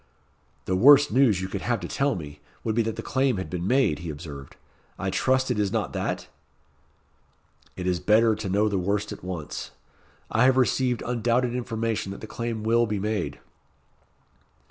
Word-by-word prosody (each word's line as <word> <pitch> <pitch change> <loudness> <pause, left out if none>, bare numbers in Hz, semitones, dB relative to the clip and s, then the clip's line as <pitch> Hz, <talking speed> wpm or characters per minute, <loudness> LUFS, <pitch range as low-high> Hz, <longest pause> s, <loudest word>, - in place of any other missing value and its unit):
"The 95 - 0
worst 140 +7 +7
news 115 -6 +3
you 95 - -3
could - - -5
have 120 -2 0
to 85 - -4
tell 140 +7 0
me, 75 -3 -8 0.2
would 110 - -1
be 115 - +2
that 115 -1 -2
the - - -6
claim 130 -4 +1
had 95 -4 -5
been 90 0 -3
made," 125 - +2
he 85 - -6
observed. 70 -3 -8 0.4
"I - - -2
trust 130 0 +1
it - - -1
is 100 -2 +1
not 110 -2 -2
that?" - - -3 1.5
"It 90 - -5
is 90 -1 +1
better 110 +3 +4
to 105 -2 -4
know 105 +3 +2
the 100 -2 0
worst 100 +3 -1
at - - -8
once. 85 -5 -5 0.6
I 115 +3 +4
have 130 0 +4
received 125 -1 +1
undoubted 120 +1 +1
information 115 -4 -2
that - - -10
the - - -6
claim 115 -1 -4
will 115 +1 +3
be 105 -1 -2
made." 105 +2 -2
110 Hz, 185 wpm, -25 LUFS, 95-120 Hz, 1.5 s, worst